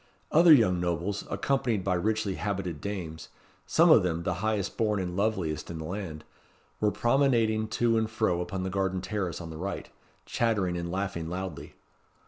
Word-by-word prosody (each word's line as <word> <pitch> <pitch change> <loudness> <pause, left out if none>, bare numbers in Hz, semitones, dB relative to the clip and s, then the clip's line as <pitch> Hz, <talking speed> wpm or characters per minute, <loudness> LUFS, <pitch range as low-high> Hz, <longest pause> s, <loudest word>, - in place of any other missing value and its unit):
Other 170 +2 +7
young 110 - +6
nobles, 90 +3 -2
accompanied 120 -7 0
by 95 - +1
richly 105 +2 0
habited 95 -6 -3
dames 85 -6 -5 0.4
some 165 +1 +5
of 115 - +8
them 85 -2 -1
the 90 - 0
highest 110 -3 -1
born 105 -3 +1
and 90 -1 -3
loveliest 95 -6 -1
in 85 - -5
the 80 - -5
land 85 -4 -5 0.6
were 105 - +3
promenading 115 -3 +2
to 115 +1 +2
and 110 0 -1
fro 110 -6 0
upon 95 +1 -4
the 95 - -3
garden 95 -1 -1
terrace 95 -3 -3
on 85 -2 -7
the 80 - -7
right, 100 +4 -5 0.3
chattering 105 -7 0
and 85 0 -3
laughing 95 -4 -3
loudly. 90 -5 -6
95 Hz, 170 wpm, -28 LUFS, 90-110 Hz, 0.6 s, of